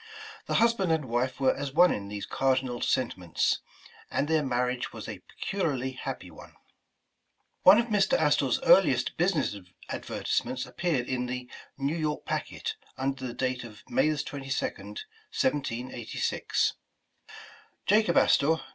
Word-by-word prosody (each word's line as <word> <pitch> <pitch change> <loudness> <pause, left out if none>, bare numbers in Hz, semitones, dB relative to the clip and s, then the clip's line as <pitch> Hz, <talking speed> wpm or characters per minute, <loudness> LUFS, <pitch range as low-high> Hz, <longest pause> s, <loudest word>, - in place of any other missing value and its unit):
The - - 0
husband 230 -6 +3
and 160 -3 +1
wife 125 +2 -1
were 135 -1 +3
as 140 -1 -4
one 180 +2 +6
in 100 -1 -5
these 100 0 -5
cardinal 130 -2 0
sentiments, 95 -9 0 0.5
and 145 - 0
their 160 -1 +2
marriage 125 -1 -1
was - - -8
a - - -6
peculiarly 145 -10 -2
happy 130 - -6
one. - - -14 1.1
One 190 +3 +9
of 235 - +3
Mr. 205 -1 +3
Astor 145 -3 +3
's - - +2
earliest 135 -10 +5
business 175 - +1 0.3
advertisements 130 0 -2
appeared 155 -9 -1
in 125 -1 -1
the 125 0 -4 0.3
"New 140 +3 -1
York 155 -2 -2
Packet" - - -3 0.2
under 130 -1 -2
date 130 0 -2
of 105 -3 -11
May - - +3
22nd, 135 -8 -3 0.3
1786. 125 -4 -1 1.1
'Macob 210 -3 +4
Astor, 140 - +5
No. - - -8
135 Hz, 135 wpm, -28 LUFS, 125-160 Hz, 1.1 s, One